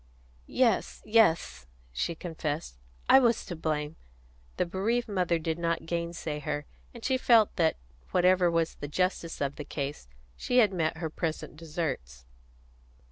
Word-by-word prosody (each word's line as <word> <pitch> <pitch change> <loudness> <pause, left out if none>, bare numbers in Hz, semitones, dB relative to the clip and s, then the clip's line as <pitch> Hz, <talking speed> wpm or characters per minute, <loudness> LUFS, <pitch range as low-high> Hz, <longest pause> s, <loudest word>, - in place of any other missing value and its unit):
"Yes, 240 -5 +1
yes," 210 - +3 0.2
she 65 - -2
confessed. 155 - -4 0.3
"I 265 - +8
was 235 -3 +2
to 175 - -5
blame." 155 -1 -2 0.6
The - - +2
bereaved 220 +7 0
mother 180 -5 +1
did 160 0 -3
not 170 -1 -1
gainsay 170 -2 -3
her, 150 0 -3 0.3
and 235 -2 -10
she 260 -1 +2
felt 230 -5 +5
that, 165 -3 +2 0.3
whatever 180 0 +4
was 165 -1 +1
the 145 - -7
justice 175 +1 -1
of 140 0 -1
the 150 - -5
case, 140 - -5 0.3
she 245 - -1
had 215 -5 +5
met 160 -3 0
her 160 -1 -4
present 160 -1 -3
deserts. 150 - -4
165 Hz, 145 wpm, -29 LUFS, 150-190 Hz, 0.6 s, I